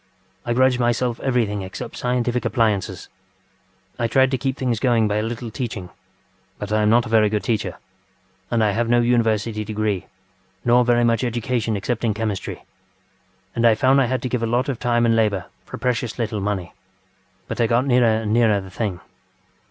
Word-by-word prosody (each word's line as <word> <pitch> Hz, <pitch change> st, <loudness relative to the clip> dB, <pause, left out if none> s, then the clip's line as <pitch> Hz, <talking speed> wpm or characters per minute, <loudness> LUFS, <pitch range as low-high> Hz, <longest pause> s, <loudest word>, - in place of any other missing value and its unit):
I 120 Hz, -, +1 dB
grudged 130 Hz, 0 st, +3 dB
myself 120 Hz, 0 st, 0 dB
everything 115 Hz, -6 st, 0 dB
except 95 Hz, 0 st, -7 dB
scientific 125 Hz, 0 st, -1 dB
appliances. 105 Hz, -6 st, 0 dB, 0.9 s
I 115 Hz, -, +1 dB
tried 130 Hz, +2 st, +3 dB
to 130 Hz, -, +1 dB
keep 135 Hz, +1 st, -2 dB
things 125 Hz, -4 st, -1 dB
going 115 Hz, -4 st, +2 dB
by 105 Hz, 0 st, 0 dB
a -, -, +1 dB
little 115 Hz, +1 st, -5 dB
teaching, 105 Hz, -8 st, -5 dB, 0.7 s
but 105 Hz, 0 st, -6 dB
I 110 Hz, -, +3 dB
am 105 Hz, -, +3 dB
not 120 Hz, +2 st, +4 dB
a -, -, -7 dB
very 110 Hz, -2 st, +4 dB
good 105 Hz, 0 st, -1 dB
teacher, 110 Hz, -3 st, -2 dB, 0.7 s
and 115 Hz, -2 st, +1 dB
I 105 Hz, -, +3 dB
have 115 Hz, +3 st, -1 dB
no 120 Hz, 0 st, +4 dB
university 115 Hz, -2 st, +1 dB
degree, 105 Hz, -2 st, -2 dB, 0.6 s
nor 120 Hz, +1 st, +5 dB
very 120 Hz, 0 st, +3 dB
much 115 Hz, +1 st, +2 dB
education 120 Hz, -2 st, -1 dB
except 115 Hz, +4 st, -3 dB
in 110 Hz, -3 st, +1 dB
chemistry, 105 Hz, -3 st, -4 dB, 0.9 s
and 115 Hz, -, -1 dB
I 115 Hz, -2 st, +6 dB
found 130 Hz, +5 st, +4 dB
I -, -, +3 dB
had 130 Hz, 0 st, -2 dB
to -, -, -1 dB
give 125 Hz, -1 st, -1 dB
a 115 Hz, -, 0 dB
lot 125 Hz, +4 st, 0 dB
of 130 Hz, -4 st, -3 dB
time 120 Hz, -1 st, +2 dB
and 115 Hz, -1 st, +3 dB
labour 105 Hz, -5 st, +1 dB, 0.2 s
for -, -, -8 dB
precious 125 Hz, -2 st, -2 dB
little 110 Hz, -3 st, -2 dB
money. 95 Hz, -3 st, -3 dB, 0.7 s
But -, -, -3 dB
I 115 Hz, -, +3 dB
got 120 Hz, +3 st, +2 dB
nearer 120 Hz, -4 st, +3 dB
and 105 Hz, 0 st, -1 dB
nearer 110 Hz, -3 st, +3 dB
the 95 Hz, -1 st, -10 dB
thing. 95 Hz, -3 st, -3 dB
115 Hz, 190 wpm, -22 LUFS, 105-120 Hz, 0.9 s, I